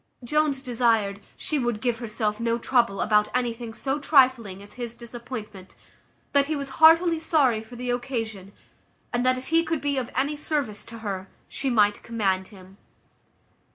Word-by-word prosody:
Jones 295 +1 +1
desired, 230 -6 +1 0.2
"She 300 - -1
would 240 -4 -1
give 235 0 -1
herself 215 -2 -2
no 230 0 0
trouble 235 -4 +1
about 210 -1 +3
anything 240 -2 -2
so 270 +5 -2
trifling 255 -9 +3
as 205 - -13
his 240 -2 -6
disappointment; 230 -5 -9 0.6
that 280 -1 +3
he 310 - -1
was 280 -1 -4
heartily 330 +1 +7
sorry 285 -9 +2
for 220 +2 -12
the 245 0 -3
occasion; 225 -6 -4 0.6
and 240 0 +1
that 255 0 +3
if 255 - -8
he 330 0 +4
could 325 -1 -1
be 285 -1 -1
of 250 -1 -5
any 280 +3 0
service 290 -8 -2
to 230 0 -10
her, 195 -1 -3 0.2
she 270 - -2
might 210 -4 +3
command 195 -5 -1
him." 190 -2 -15
240 Hz, 165 wpm, -25 LUFS, 215-275 Hz, 0.6 s, heartily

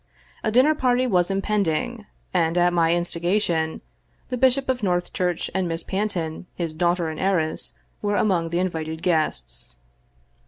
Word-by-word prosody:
A - - +1
dinner 255 +7 +5
party 255 -3 +2
was 180 -7 +2
im 195 0 -1
pending, 210 +3 -1 0.3
and, 170 -1 +2
at 175 0 +4
my 165 -1 +3
instigation, 175 -1 0 0.5
the 250 - -1
Bishop 260 +2 +3
of 260 -1 0
Northchurch 180 -2 -1
and 190 -1 0
Miss 165 0 -3
Panton, 185 -5 -3
his 165 -3 -3
daughter 170 0 +1
and 155 - -6
heiress, 180 -5 0 0.3
were 205 -1 0
among 185 -5 +1
the 170 - -1
invited 160 -3 -2
guests. 65 - -1
175 Hz, 150 wpm, -24 LUFS, 165-210 Hz, 0.5 s, dinner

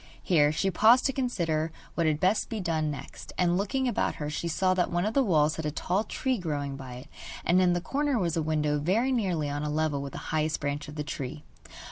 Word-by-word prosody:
Here 150 -5 +4
she 190 +5 0
paused 225 +8 +5
to 270 - +2
consider 165 - -1 0.2
what 170 -2 +1
had 150 -1 +1
best 190 +5 +2
be 225 - -3
done 160 -4 0
next, 145 - -8
and 175 -1 +2
looking 255 +8 0
about 245 - 0
her 150 -1 -4
she 170 - -3
saw 185 +3 +2
that 180 -1 +1
one 175 +1 0
of 215 - -1
the 275 - +4
walls 155 - +2
had 160 - -4
a - - +1
tall 185 +7 -1
tree 255 +2 -1
growing 145 -5 -3
by 130 -2 -8
it, 130 +3 -10 0.4
and 180 +2 +4
in 180 -1 +4
the 175 - -1
corner 285 +5 0
was 170 -6 0
a 165 - +1
window 150 -1 0
very 210 - +1
nearly 185 - 0
on 145 0 -3
a 150 - -2
level 150 -2 0
with 140 -1 -6
the - - -6 0.2
highest 155 0 +1
branches 145 0 -3
of 150 - -9
the 150 - -3
tree. 145 -1 -5
165 Hz, 240 wpm, -28 LUFS, 150-195 Hz, 0.4 s, paused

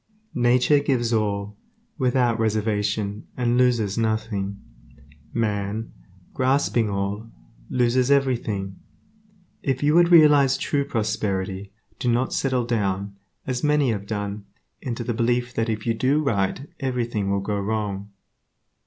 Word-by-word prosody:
Nature 125 +4 +4
gives 120 -5 0
all, 105 -1 -1 0.4
without 125 -3 +2
reservation, 105 -1 -1
and 120 -1 +1
loses 120 -5 +2
nothing; 110 -3 -1 0.7
man, 105 -1 -2 0.4
grasping 130 -4 +1
all, 100 +3 -3 0.4
loses 125 +1 +2
everything. 115 -9 0 0.8
If 135 0 -1
you 150 +1 +3
would 170 +1 +5
realize 145 -5 +6
true 140 +1 0
prosperity 100 -5 -2 0.3
do 120 - +1
not 125 +2 0
settle 130 -3 0
down, 100 -4 -1 0.3
as 125 -1 -3
many 150 -4 +3
have 100 -2 -4
done, 105 -1 -4 0.4
into 120 -2 -4
the 120 - -2
belief 120 +1 0
that 115 0 -1
if 110 -1 -3
you 115 - +2
do 135 +7 +1
right 115 +2 -1
everything 120 -6 -1
will 100 0 +1
go 100 +1 -2
wrong. 100 -1 -3
115 Hz, 125 wpm, -24 LUFS, 105-130 Hz, 0.8 s, realize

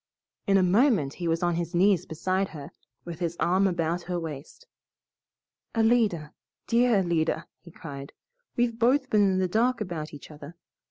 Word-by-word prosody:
In 195 0 +4
a 190 - +4
moment 190 - +3
he 175 - -4
was 165 +1 0
on 175 0 +2
his 170 0 -3
knees 185 -1 +3
beside 185 +4 -1
her, 150 0 -9 0.3
with 170 -1 -7
his 170 -1 -3
arm 190 +3 +3
about 170 -1 -1
her 175 -1 -1
waist. 160 - -8 1.1
"Alida, 220 -9 +2 0.3
dear 240 0 +3
Alida!" 170 -4 0
he 175 - -15
cried, 140 -4 -9 0.4
"we've 235 -1 0
both 260 +3 +2
been 210 - +4
in - - 0
the 185 0 +1
dark 230 +6 +1
about 170 -7 -5
each 145 +1 -11
other. 150 +2 -11
175 Hz, 165 wpm, -27 LUFS, 165-215 Hz, 1.1 s, In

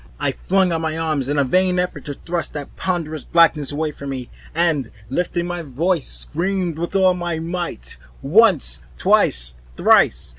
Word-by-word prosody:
I - - 0
flung 190 -1 +1
out 165 -1 -1
my 160 0 -2
arms 155 -5 -1
in 145 - 0
a 140 - +4
vain 180 +6 +2
effort 180 0 -2
to 145 -2 -5
thrust 170 0 -4
that 145 -2 -7
ponderous 165 -5 -2
blackness 165 -4 +3
away 155 +1 -2
from 140 -1 -8
me, 130 -3 -6 0.2
and 160 -8 +1 0.2
lifting 175 +4 -1
up - - -5
my 175 0 -3
voice, 160 +3 -1
screamed 175 0 -1
with 170 +3 -4
all 190 -1 +4
my 175 -2 -3
might, 165 - -5 0.3
once, 155 - +4 0.2
twice, - - +2 0.2
thrice. 65 +2 +4
165 Hz, 175 wpm, -20 LUFS, 140-180 Hz, 0.3 s, a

